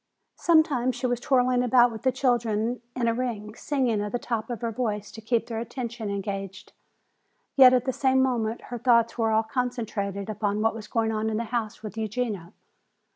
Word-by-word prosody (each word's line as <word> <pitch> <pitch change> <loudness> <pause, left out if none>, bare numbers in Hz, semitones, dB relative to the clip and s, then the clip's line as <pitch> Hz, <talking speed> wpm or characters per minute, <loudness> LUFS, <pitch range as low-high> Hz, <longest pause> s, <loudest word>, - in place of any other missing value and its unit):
Sometimes 285 -7 +3
she 255 - -4
was 245 -1 -1
whirling 250 -2 +3
about 245 0 +5
with 220 -2 -7
the 260 - +2
children 240 -2 0
in 245 -2 0
a 230 - +3
ring, 230 -4 -3
singing 245 -5 0
at 205 0 -3
the 245 - 0
top 230 -2 -3
of 235 -3 -4
her 230 -1 -1
voice 210 -3 -3
to 225 - -10
keep 230 +1 0
their 225 -2 -4
attention 235 -2 -5
engaged. 195 -1 -5 0.8
Yet 260 -2 +9
at 255 -1 +2
the 260 - 0
same 265 0 +2
moment 235 -4 0
her 240 - -3
thoughts 235 -1 +3
were 225 -1 +2
all 220 0 +3
concentrated 220 -5 -3
upon 210 -1 -1
what 225 +1 +2
was 215 -1 -8
going 225 -1 0
on 220 0 -1
in 215 - -1
the 230 - -1
house 225 -2 -2
with 215 +1 -7
Eugenia. 215 -5 -3
230 Hz, 195 wpm, -26 LUFS, 215-250 Hz, 0.8 s, Yet